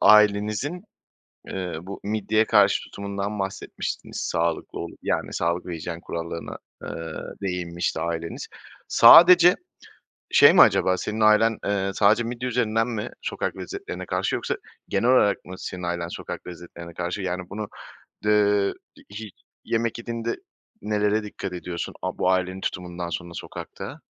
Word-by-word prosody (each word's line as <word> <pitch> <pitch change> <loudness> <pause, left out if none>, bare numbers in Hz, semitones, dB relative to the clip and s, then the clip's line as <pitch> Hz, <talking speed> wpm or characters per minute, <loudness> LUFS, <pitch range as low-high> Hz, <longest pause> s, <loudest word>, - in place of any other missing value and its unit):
ailenizin, 105 - +4 0.6
eee, 90 -3 -4
bu 95 +2 -8
midyeye 110 +1 +1
karşı 105 -3 +4
tutumundan 100 +1 -4
bahsetmiştiniz, 95 0 -4
sağlıklı 85 0 -1
olup, - - -7
yani, - - -1
sağlık 85 +2 -1
ve 90 - -4
hijyen 85 +1 -5
kurallarına, 85 -1 -5 0.2
eee, - - -7 0.5
değinmişti 90 -2 -2
aileniz. 85 0 -4 0.4
Sadece, 175 +8 +9 0.7
şey - - +8
mi - - +6
acaba, 95 0 +5
senin 105 +4 -4
ailen, 110 +1 +5
eee, 100 -1 0
sadece 105 +4 +4
midye 120 +2 -3
üzerinden 115 -1 +1
mi 110 -4 -3
sokak - - -3
lezzetlerine - - -6
karşı - - -1
yoksa - - -2 0.3
genel 115 +6 +2
olarak 105 -6 +3
mı 90 - -8
senin 90 - -6
ailen 85 -1 -2
sokak - - -7
lezzetlerine 85 -1 -10
karşı? 90 +3 -3
Yani, 90 0 -2
bunu, 105 +1 -5 0.6
eee, 105 -1 +3 0.2
i - - -17 0.2
hi 110 -2 -7 0.3
yemek 115 0 -1
yediğinde 115 0 -3 0.5
nelere 105 +1 +1
dikkat 100 -2 -6
ediyorsun 90 -1 -5
a - - -3
bu 95 - +2
ailenin 95 +1 0
tutumundan 90 -1 -4
sonra 85 +2 -5
sokakta? - - -8
100 Hz, 140 wpm, -25 LUFS, 90-110 Hz, 0.7 s, Sadece